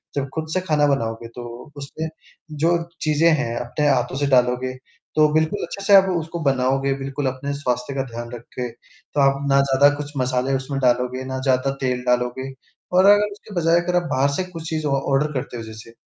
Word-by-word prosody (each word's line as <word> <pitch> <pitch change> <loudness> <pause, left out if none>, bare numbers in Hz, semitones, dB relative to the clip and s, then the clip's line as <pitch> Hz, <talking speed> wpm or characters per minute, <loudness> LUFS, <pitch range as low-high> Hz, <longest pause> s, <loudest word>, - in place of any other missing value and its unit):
जब 140 -1 -2
खुद 160 0 -3
से 185 - +1
खाना 150 -5 +2
बनाओगे, 115 -4 -1
तो 120 +3 -10
उसमें 145 +3 -5 0.6
जो 170 +1 +4 0.2
चीज़ें 155 +2 +3
हैं, 130 -7 0
अपने 135 +6 -1
हाथों 130 -2 +1
से 145 0 0
डालोगे, 125 -1 +2 0.4
तो 155 0 +6
बिल्कुल 160 +6 +1
अच्छे 200 - -7
से 200 0 +7
आप 195 -1 +8
उसको 165 +1 -4
बनाओगे 135 0 +1
बिल्कुल 135 +1 -4
अपने 130 +2 -3
स्वास्थ्य 125 -1 -2
का 135 - 0
ध्यान 120 0 -6
रख 120 -2 -7 0.2
के। 125 -1 -2
तो 120 +4 -9
आप 135 0 +3
ना 135 0 +5
ज़्यादा 140 +1 +5
कुछ 145 0 -6
मसाले 130 +1 0
उसमें 135 +1 -3
डालोगे, 125 +1 +1
ना 130 0 -4
ज़्यादा 130 0 +1
तेल 125 -1 -1
डालोगे 125 +2 0 0.4
और 185 +1 +5
अगर 205 +1 +5
उसके 205 +1 -12
बजाय 170 0 +3
अगर 180 +1 -1
आप 175 - +3
बाहर 135 +1 +2
से 185 - 0
कुछ 165 -2 -7
चीज़ 155 -1 -2
ऑ - - -1 0.2
ऑर्डर 145 +3 +2
करते 130 -2 -4
हो 115 - -6
जैसे, 110 +1 -11
135 Hz, 205 wpm, -22 LUFS, 125-155 Hz, 0.6 s, आप